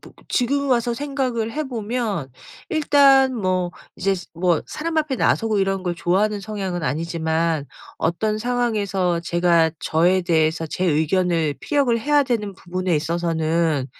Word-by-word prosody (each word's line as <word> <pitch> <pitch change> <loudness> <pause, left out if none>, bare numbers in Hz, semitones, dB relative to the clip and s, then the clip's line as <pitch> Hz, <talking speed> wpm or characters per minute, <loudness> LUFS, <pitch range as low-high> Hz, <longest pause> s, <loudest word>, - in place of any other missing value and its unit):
보 - - -15 0.2
지금 280 +3 0
와서 240 -1 +1
생각을 255 -5 -2
해 310 - -2
보면 220 - -3 0.4
일단 280 -4 +5
뭐 185 -3 0 0.2
이제 195 +1 0 0.2
뭐 170 -2 +1
사람 325 +1 -4
앞에 300 -3 +1
나서고 220 -4 +1
이런 195 -1 -1
걸 175 - -1
좋아하는 200 +5 0
성향은 195 -4 -4
아니지만 160 +1 -1 0.3
어떤 210 +6 0
상황에서 210 -7 0
제가 170 -1 +2
저에 175 +4 +2
대해서 160 -1 +1
제 185 +4 -3
의견을 160 0 +1
피력을 275 -6 +1
해야 290 +3 +3
되는 215 -6 -2
부분에 185 -2 -2
있어서는 160 -2 0
190 Hz, 295 characters per minute, -22 LUFS, 170-240 Hz, 0.4 s, 일단